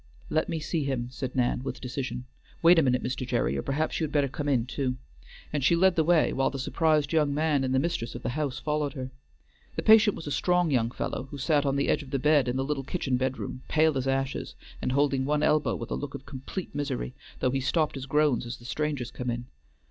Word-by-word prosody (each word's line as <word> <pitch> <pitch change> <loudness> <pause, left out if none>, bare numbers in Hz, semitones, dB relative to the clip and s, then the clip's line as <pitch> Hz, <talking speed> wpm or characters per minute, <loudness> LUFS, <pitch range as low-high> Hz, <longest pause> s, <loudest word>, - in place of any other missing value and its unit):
"Let 155 - +1
me 160 - -1
see 155 0 -1
him," 130 -3 -2
said 130 0 -5
Nan 125 -1 +1
with 135 - -5
decision. 125 -1 -4 0.4
"Wait 170 0 +8
a - - +5
minute, 125 -3 +2
Mr. 130 +1 -2
Gerry, 70 - 0
or 70 - -1
perhaps 150 - -1
you - - -1
had 155 - -2
better 145 -2 +2
come 145 +2 -3
in 125 -4 +2
too," 130 0 -2 0.6
and 145 -3 0
she 170 - +5
led 185 +1 +4
the 160 - +3
way, 165 -1 +3
while 135 - +2
the 135 - -5
surprised 150 +2 +1
young 150 -3 +2
man 150 -2 +2
and 130 - -1
the 130 - +3
mistress 130 -6 -1
of 120 - -7
the - - -1
house 140 0 -2
followed 150 -2 -1
her. 130 -3 -6 0.6
The - - -2
patient 215 -1 +6
was - - -8
a 145 - -4
strong 180 +1 +2
young 115 -4 +2
fellow, 125 - -4
who 145 - -7
sat 145 0 +2
on 135 - +1
the 140 - +1
edge - - +2
of 140 - -11
the 135 - 0
bed 150 0 +3
in 125 - 0
the 135 - 0
little 140 -1 -2
kitchen 135 -3 -1
bedroom, 130 0 -3
pale 155 -1 +3
as 135 0 -1
ashes, 135 0 -1 0.3
and - - -1
holding 140 -1 +2
one 150 +2 +1
elbow 150 0 +2
with - - -6
a - - +1
look 145 -1 -5
of 135 - -8
complete 140 +7 -6
misery, 140 - -3 0.3
though 130 - +1
he 135 - 0
stopped 155 +3 +1
his 135 -1 -6
groans 145 -4 +2
as 120 - -5
the 120 - -16
strangers 145 -2 -2
came 125 -1 -4
in. 120 0 -3
140 Hz, 245 wpm, -28 LUFS, 130-150 Hz, 0.6 s, Wait